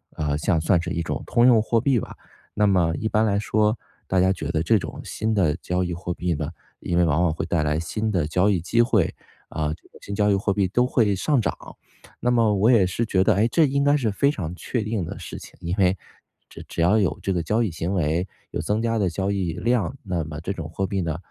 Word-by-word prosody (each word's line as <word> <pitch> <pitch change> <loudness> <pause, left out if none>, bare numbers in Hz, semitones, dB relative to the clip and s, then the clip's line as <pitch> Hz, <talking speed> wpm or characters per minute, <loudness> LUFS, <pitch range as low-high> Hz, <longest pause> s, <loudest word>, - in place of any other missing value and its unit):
呃， 75 -2 -1
像 85 +1 +1
算 85 +2 +2
是 85 - -5
一 85 -2 -2
种 - - -3
通 120 - +3
用 120 -3 +6
货 115 +1 +1
币 130 0 +2
吧， - - -8 0.4
那 105 - +3
么 90 -5 +2
一 110 - -2
般 110 0 +2
来 100 -2 +1
说， 105 +2 +1 0.3
大 95 - +1
家 95 +1 +3
觉 95 - -5
得 80 -1 0
这 105 +6 +3
种 - - -7
新 110 0 -2
的 85 -7 +2
交 90 +1 -2
易 90 -1 -3
货 90 +1 -4
币 90 -1 -1
呢， 75 0 -3 0.3
因 85 - -2
为 90 - +4
往 80 0 +2
往 80 -3 +2
会 80 - -3
带 85 - 0
来 75 0 0
新 110 +7 -2
的 90 -7 +1
交 90 +6 +2
易 95 -5 +1
机 115 +7 +2
会， 110 -8 +2 0.4
啊， 75 -1 -2
这 - - -15
个 - - -17
新 100 - -6
交 105 0 +2
易 100 - +4
货 100 +1 0
币 100 -1 +1
都 125 +7 +2
会 110 -6 +2
上 135 +7 +1
涨， - - -2 0.6
那 125 - +2
么 115 -3 +3
我 105 +5 +4
也 110 -6 +5
是 115 +6 -1
觉 95 -4 +1
得， 105 0 +3
诶， 105 +3 +3
这 165 - +4
应 140 0 0
该 145 +1 +4
是 120 -6 0
非 140 +8 +2
常 90 - -5
确 120 +6 -3
定 105 -2 -2
的 - - -7
事 - - -7
情， - - -14
因 85 +1 -2
为 95 0 +3 0.5
只 - - -10
只 - - -7
要 90 +6 +4
有 100 - 0
这 95 - -1
个 85 -2 -1
交 110 +8 +1
易 110 - 0
行 80 +4 -3
为， 85 -1 0 0.3
有 - - -2
增 105 +2 -1
加 115 0 0
的 100 -4 +1
交 95 +3 -2
易 95 -4 -1
量， 120 +3 0
那 90 -5 -2
么 75 0 -7
这 95 - -3
种 80 -4 -6
货 95 +4 -2
币 100 -1 -1
呢， 80 -2 -2
95 Hz, 280 characters per minute, -23 LUFS, 85-110 Hz, 0.6 s, 用